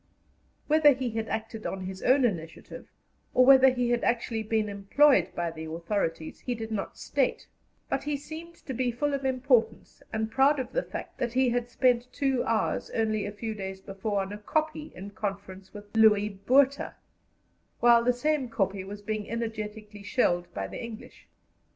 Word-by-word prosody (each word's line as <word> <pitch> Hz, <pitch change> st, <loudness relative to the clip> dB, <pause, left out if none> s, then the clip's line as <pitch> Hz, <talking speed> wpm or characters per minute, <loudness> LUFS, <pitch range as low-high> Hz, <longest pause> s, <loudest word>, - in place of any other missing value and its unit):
Whether 300 Hz, -1 st, +6 dB
he 255 Hz, -2 st, -3 dB
had 225 Hz, 0 st, -3 dB
acted 225 Hz, 0 st, -4 dB
on 190 Hz, -, -4 dB
his 185 Hz, 0 st, -6 dB
own 260 Hz, +1 st, +4 dB
initiative, 165 Hz, -7 st, -5 dB, 0.5 s
or 255 Hz, -, +6 dB
whether 265 Hz, 0 st, +8 dB
he 245 Hz, -1 st, 0 dB
had 240 Hz, -1 st, +1 dB
actually 230 Hz, -1 st, 0 dB
been 220 Hz, 0 st, 0 dB
employed 200 Hz, -, +3 dB
by 170 Hz, -1 st, -1 dB
the 160 Hz, 0 st, -7 dB
authorities, 165 Hz, 0 st, -3 dB
he 245 Hz, -, -3 dB
did 225 Hz, -1 st, -6 dB
not 205 Hz, -3 st, -4 dB
state; -, -, -1 dB, 0.4 s
but 270 Hz, -, -1 dB
he 295 Hz, -1 st, -1 dB
seemed 320 Hz, +4 st, -9 dB
to 265 Hz, -, -4 dB
be 255 Hz, 0 st, 0 dB
full 290 Hz, +5 st, -1 dB
of 275 Hz, -1 st, -2 dB
importance, 255 Hz, -4 st, +1 dB
and 220 Hz, 0 st, -2 dB
proud 270 Hz, +3 st, +4 dB
of 255 Hz, -1 st, -4 dB
the -, -, +1 dB
fact -, -, -8 dB
that 240 Hz, -1 st, -1 dB
he 260 Hz, 0 st, +3 dB
had 240 Hz, 0 st, -1 dB
spent 250 Hz, 0 st, +2 dB
two 270 Hz, -3 st, 0 dB
hours 225 Hz, -1 st, 0 dB
only 215 Hz, -2 st, 0 dB
a -, -, -4 dB
few 220 Hz, +2 st, -5 dB
days 190 Hz, -2 st, -6 dB
before 195 Hz, +1 st, -3 dB
on 195 Hz, +1 st, -5 dB
a 210 Hz, -, -7 dB
kopje 310 Hz, +6 st, -2 dB
in 195 Hz, +2 st, -8 dB
conference 195 Hz, -2 st, -6 dB
with 205 Hz, 0 st, -12 dB
Louis 210 Hz, -2 st, +5 dB
Botha, 260 Hz, +8 st, +2 dB, 0.8 s
while 235 Hz, -1 st, +6 dB
the 250 Hz, -, +4 dB
same 275 Hz, +1 st, 0 dB
kopje 195 Hz, -3 st, -1 dB
was 205 Hz, +2 st, -9 dB
being 215 Hz, 0 st, -3 dB
energetically 215 Hz, -2 st, -5 dB
shelled 175 Hz, -5 st, 0 dB
by 95 Hz, -, -4 dB
the 95 Hz, -, -7 dB
English. 230 Hz, -1 st, -10 dB
225 Hz, 180 wpm, -28 LUFS, 200-255 Hz, 0.8 s, whether